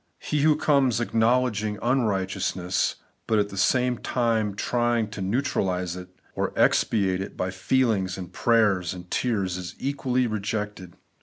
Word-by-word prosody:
He 150 - -2
who 155 0 +5
comes 140 -6 +2
acknowledging 115 -2 +1
unrighteous 105 -7 0
ness^ 90 0 -1 0.3
but 110 - +2
at 105 -1 +1
the 100 - -8
same 125 +4 +2
time 115 -4 0
trjdng 120 -1 0
to 110 - -6
neutralize 95 -5 -1
it 90 0 -9 0.2
or - - -1
to - - -8
expiate 95 -4 +2
it 95 - -7
by 90 0 -1
feelings, 95 -2 +1
and 90 -1 -8
prayers, 105 -7 +2
and 90 0 -11
tears, 100 -7 0
is 90 -1 -7
equally 130 -2 0
rejected. 105 -4 -4
105 Hz, 150 wpm, -25 LUFS, 95-120 Hz, 0.3 s, who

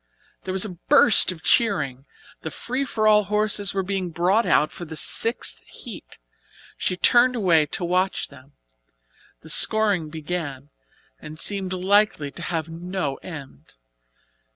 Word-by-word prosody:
There 190 - -4
was 190 +2 +2
a 185 -5 -9
burst 240 -9 +6
of 165 -3 -11
cheering. 145 - 0 0.4
The 160 - -5
free 255 - -4
for 215 -4 -1
all 210 -1 +4
horses 210 -1 0
were 195 - 0
being 190 -1 -3
brought 180 +7 +1
out 150 - +2
for - - -9
the 160 -1 -9
sixth 230 +9 0
heat. - - -11 0.6
She 180 - -2
turned 245 +6 +3
away 170 -9 +2
to 175 - -3
watch 185 +2 -1
them. 130 +3 -18 0.9
The 160 - -13
scoring 205 -5 +3
began, 150 -3 -6 0.5
and 155 +1 -11
seemed 195 -1 +1
likely 185 -5 +1
to 175 - -9
have 165 -2 -3
no 170 -3 -5
end. 150 - -12
180 Hz, 145 wpm, -23 LUFS, 160-210 Hz, 0.9 s, burst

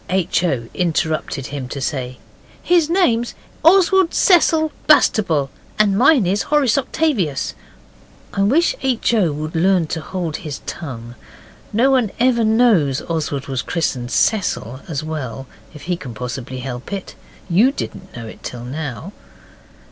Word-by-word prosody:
H. 185 -2 +1
O. 130 -10 -1
interrupted 160 -5 -1
him 135 -3 -4
to 140 - -6
say, 130 -3 -3 0.5
'His 340 -3 +3
name's 240 -11 +1 0.3
Oswald 375 +1 +5
Cecil 325 -5 +4 0.2
Bastable, 165 - +3 0.3
and 205 -2 +3
mine 255 - +5
is 195 +4 +1
Horace 285 -6 +2
Octavius.' 260 - 0 0.8
I 195 - -1
wish 280 - +3
H. 255 -3 +1
O. 195 -8 +3
would 155 +2 -5
learn 180 +1 +3
to 160 +1 -4
hold 170 -3 -4
his 150 -3 -7
tongue. 120 -7 -7 0.6
No 245 +6 +3
one 250 -5 +2
ever 240 -1 +3
knows 215 - +3
Oswald 150 -4 -3
was 135 -3 -2
christened 130 -8 -2
Cecil 135 - 0
as 155 -2 -3
well, 135 -5 -5 0.3
if 150 - -12
he 180 +1 -1
can 130 -9 -9
possibly 125 +2 -5
help 125 +3 -6
it. 195 -2 -5 0.3
YOU 200 +9 +4
didn't 185 -8 -7
know 115 - -7
it 110 - -11
till 120 -1 -7
now. 145 +5 -6
175 Hz, 145 wpm, -19 LUFS, -, 0.8 s, Oswald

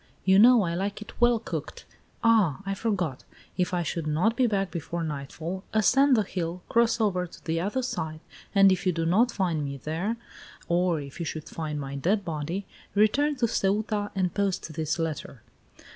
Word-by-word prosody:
You 190 +1 +6
know 240 0 +7
I 170 -2 -1
like 195 +4 -2
it 215 - -14
well 240 -1 +5
cooked. 225 - -6 0.4
Ah, 210 -9 +3
I 195 - -1
forgot. 185 - -2 0.3
If 180 -1 0
I 175 -1 0
should 165 0 -3
not 180 +10 +2
be 250 0 +3
back 195 -3 0
before 170 0 -4
nightfall, 160 +5 -5
ascend 260 +5 +4
the 215 - +3
hill, 180 -2 -4
crossover 220 -6 +2
to - - -15
the 165 -1 0
other 210 +8 -1
side, 160 -11 -3 0.4
and 195 -1 +7
if 185 0 0
you 180 - +3
do 165 0 -1
not 220 +9 +3
find 175 -8 -1
me 140 -1 -4
there, 165 - -2 0.5
or 175 -1 +2
if 140 +1 -9
you 170 - -2
should 155 -1 -5
find 155 -2 -4
my 140 -1 -5
dead 190 +8 0
body, 165 +5 -3 0.3
return 280 +9 +3
to 245 -3 +1
Ceuta 205 0 0
and 185 -3 0
post 195 -5 -1
this 155 +1 -1
letter. 155 -7 -4
185 Hz, 185 wpm, -27 LUFS, 160-215 Hz, 0.5 s, know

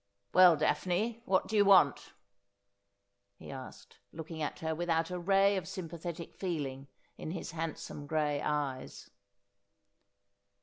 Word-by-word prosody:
' 100 - -47
Well, 180 -2 +8
Daphne, 185 +9 0
what 190 -1 +2
do 220 - -3
you 205 - +6
want 185 -9 +4 0.6
?' 100 0 -50
he - - -10
asked, 130 -1 -10
looking 160 0 -7
at 150 - -2
her 160 0 -2
without 165 0 0
a 180 - -3
ray 195 +2 +3
of 185 - -4
sympathetic 170 -2 -6
feeling 140 -7 -4 0.3
in - - -5
his 170 0 -5
handsome 160 -2 -5
gray 150 -2 0
eyes. 140 -3 -3
160 Hz, 135 wpm, -32 LUFS, 145-180 Hz, 0.6 s, Well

